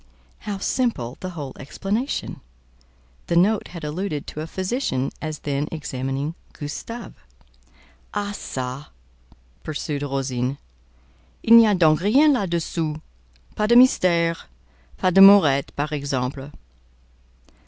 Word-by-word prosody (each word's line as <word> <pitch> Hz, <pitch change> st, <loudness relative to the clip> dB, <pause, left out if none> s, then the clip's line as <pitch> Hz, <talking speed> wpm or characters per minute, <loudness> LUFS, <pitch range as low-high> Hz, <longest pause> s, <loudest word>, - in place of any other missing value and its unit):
How 200 Hz, -, -2 dB
simple 195 Hz, -, -1 dB
the 185 Hz, -, -5 dB
whole 140 Hz, -3 st, -6 dB
explanation! 200 Hz, -, -3 dB, 0.9 s
The 170 Hz, -, 0 dB
note 200 Hz, +5 st, +3 dB
had 170 Hz, -3 st, -10 dB
alluded 150 Hz, 0 st, -3 dB
to 155 Hz, -, -7 dB
a 155 Hz, -, -5 dB
physician 185 Hz, -, -2 dB
as 155 Hz, -1 st, -4 dB
then 145 Hz, 0 st, -2 dB
examining 140 Hz, -1 st, -4 dB, 0.2 s
"Gustave." 230 Hz, +11 st, -7 dB, 1.0 s
"Ah 205 Hz, -1 st, -3 dB
ça!" 130 Hz, -4 st, -5 dB, 0.8 s
pursued 150 Hz, -1 st, -4 dB
Rosine; 135 Hz, -2 st, -2 dB, 0.9 s
"il 230 Hz, -, +7 dB
n'y 230 Hz, -1 st, +8 dB
a 205 Hz, -, +3 dB
donc 155 Hz, -4 st, +4 dB
rien 275 Hz, +10 st, +5 dB
là 200 Hz, -8 st, -1 dB
dessous: 160 Hz, -2 st, -2 dB, 0.6 s
pas 210 Hz, -, 0 dB
de 235 Hz, -, +4 dB
mystère, 170 Hz, -9 st, +4 dB, 0.5 s
pas 185 Hz, -, +1 dB
d'amourette, 195 Hz, -8 st, +7 dB
par 150 Hz, +1 st, -3 dB
exemple?" 140 Hz, -1 st, -3 dB
160 Hz, 115 wpm, -22 LUFS, 140-200 Hz, 1.0 s, n'y